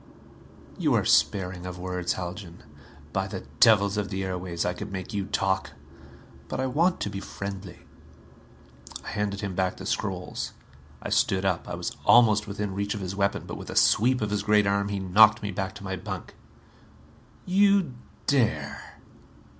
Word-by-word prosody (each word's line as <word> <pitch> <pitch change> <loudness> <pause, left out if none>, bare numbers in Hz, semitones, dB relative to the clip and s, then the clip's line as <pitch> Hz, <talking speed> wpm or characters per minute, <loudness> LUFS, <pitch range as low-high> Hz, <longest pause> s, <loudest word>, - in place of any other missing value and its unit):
"You - - +2
are - - +2
sparing 90 -2 +2
of 90 -1 -6
words, 90 -1 -2
Haljan. 90 -1 -7 0.5
By - - 0
the - - -6 0.2
devils 100 -2 +5
of 105 -2 -1
the 95 -1 -3
airways, 90 -2 -3
I 90 - 0
could 105 +3 -7
make 95 +3 -5
you 100 -2 -2
talk! 95 0 0 0.7
But - - -4
I 130 - +1
want 165 +8 +2
to - - -1
be 100 - -4
friendly." 100 -2 -7 1.2
I - - -5
handed 100 -1 -2
him 100 -3 -3
back 95 0 -1
the 95 - -8
scrolls. 95 -4 -3 0.5
I - - -4
stood 95 0 +2
up. 90 -3 0
I - - -3
was - - -4
almost 110 -3 +5
within 100 -1 -3
reach 100 +2 -2
of 105 - -5
his 95 0 -4
weapon, 100 0 0
but - - -6
with - - -9
a - - -6
sweep 125 +3 +4
of 105 -1 -1
his 105 - 0
great 105 0 +3
arm 100 0 +1
he 100 - -2
knocked 105 +4 +5
me 105 - -2
back 95 +1 -4
to 100 - -10
my 95 -1 -3
bunk. - - -7 1.1
"You 195 -5 +3 0.3
dare?" 110 - 0
100 Hz, 175 wpm, -27 LUFS, 95-105 Hz, 1.2 s, devils